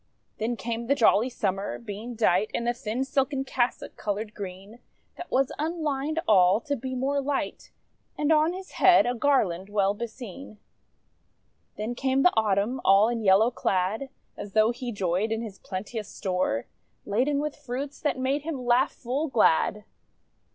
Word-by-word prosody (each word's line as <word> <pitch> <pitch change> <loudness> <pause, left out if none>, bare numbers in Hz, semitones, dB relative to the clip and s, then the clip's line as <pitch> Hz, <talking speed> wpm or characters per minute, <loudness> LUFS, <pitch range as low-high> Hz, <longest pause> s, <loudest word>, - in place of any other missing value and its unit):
Then 230 +2 -1
came 235 0 -4
the 280 - +3
Jolly 230 -1 +4
Summer, 195 -5 -2
being 230 +2 -7
dight 210 -2 +2
In 235 - -2
a 240 - +2
thin 240 +1 -3
silken 270 0 0
cassock, 250 -2 -2
coloured 210 +1 -3
green, 195 +3 -8 0.4
That 350 - -8
was 265 0 +1
unlined 310 -1 -1
all, 190 -1 +5
to 285 +4 -2
be 260 0 -5
more 275 +2 0
light: 275 0 -3 0.5
And 300 +1 +1
on 310 +1 +4
his 375 +1 -8
head 370 -1 +5
a 245 - +1
garland 210 -9 +1
well 200 -1 +2
beseen. 230 +1 -8 1.2
Then 215 +3 -3
came 265 +2 +1
the 360 - +5
Autumn, 220 +3 +1
all 200 +3 +5
in 235 -1 -2
yellow 210 +4 +5
clad 200 +5 -1 0.3
As 200 - -8
though 220 +1 +4
he 245 0 -5
joyed 195 +1 -1
in 225 +1 -1
his 205 -4 -8
plenteous 205 +3 -5
store, 180 - -1 0.4
Laden 255 +8 +1
with 300 0 -3
fruits 275 0 -6
that 295 - -1
made 265 +3 0
him 290 -5 -5
laugh 245 +2 +3
full 270 +6 -2
glad. 210 - +2
235 Hz, 160 wpm, -26 LUFS, 205-270 Hz, 1.2 s, all